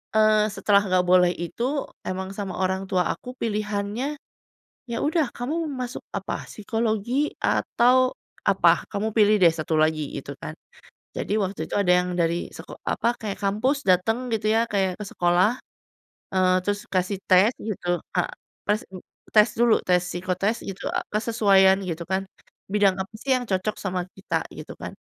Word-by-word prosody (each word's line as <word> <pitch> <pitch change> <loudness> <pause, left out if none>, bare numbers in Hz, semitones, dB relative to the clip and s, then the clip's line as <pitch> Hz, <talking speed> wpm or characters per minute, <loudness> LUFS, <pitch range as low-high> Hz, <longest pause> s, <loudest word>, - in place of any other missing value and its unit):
eee, 215 -1 +5
setelah 200 0 +3
gak 180 -1 +3
boleh 180 -1 +5
itu, 240 - -2 0.2
emang 190 0 -3
sama 195 -3 -4
orang 190 0 0
tua 180 -1 +3
aku 250 - -9
pilihannya, 210 +5 -2 0.7
"Ya 235 -1 -3
udah 310 -1 +2
kamu 245 +5 -3
mau 265 -4 -4
masuk 245 +1 -5 0.2
apa? - - -4
Psikologi, 225 +5 -1
atau 255 +1 +3 0.3
apa? - - +4
Kamu 215 +2 -1
pilih 210 0 +6
deh 170 -2 +7
1 160 0 -2
lagi," 155 0 +2 0.2
gitu - - -7
kan. - - -5 0.6
Jadi - - -2
waktu 195 -2 -2
itu - - -3
ada 200 -3 +3
yang 180 - -4
dari 170 0 0
seko - - -9
apa 235 - 0
kayak 210 -3 -4
kampus 250 +9 0
datang 225 +7 +2
gitu 215 -1 0
ya, 225 +1 +3
kayak 190 -3 0
ke 210 - -5
sekolah, 185 +5 +2 0.7
eee, 185 -1 +4
terus 205 0 +1
kasih 185 +2 +1
tes 190 +5 +6
gitu, 205 -5 -4 0.3
eee, - - +1 0.4
tes 210 +1 +2 0.5
tes 215 +1 +6
dulu 235 -2 +5
tes 180 -1 +4
psikotes 185 +4 -1
gitu, 195 -1 -7 0.3
kesesuaian 200 -4 +4
gitu 170 -1 -3
kan, 190 +1 0 0.5
bidang 200 -2 +4
apa 190 +3 -8
sih 275 - -1
yang 250 - -4
cocok 190 +2 0
sama 185 -2 -2
kita, 195 - -2
gitu - - -9
kan. - - -6
205 Hz, 160 wpm, -24 LUFS, 185-225 Hz, 0.7 s, deh